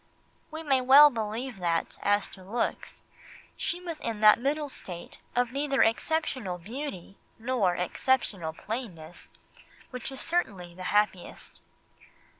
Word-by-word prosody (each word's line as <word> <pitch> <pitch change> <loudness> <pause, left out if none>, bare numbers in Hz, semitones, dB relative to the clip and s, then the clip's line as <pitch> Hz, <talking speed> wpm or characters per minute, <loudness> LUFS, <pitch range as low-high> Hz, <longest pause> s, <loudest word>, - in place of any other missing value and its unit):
We 315 +1 -7
may 270 -4 +2
well 280 +3 +9
believe 225 +1 -4
that, 170 -2 -1
as 205 0 +2
to 190 - -12
looks, 225 +6 -3 0.5
she 350 - -2
was 340 -3 -6
in 225 -2 -4
that 215 +1 +7
middle 290 +4 -1
state 175 -10 -7 0.2
of 245 0 +1
neither 275 0 +2
exceptional 225 - 0
beauty 200 - -7 0.2
nor 225 -6 +1
exceptional 180 -2 0
plainness, 175 -4 -7 0.6
which 250 +1 -6
is 265 - -8
certainly 200 - -2
the 185 +1 -8
happiest. 205 -3 -1
230 Hz, 125 wpm, -28 LUFS, 185-270 Hz, 0.6 s, well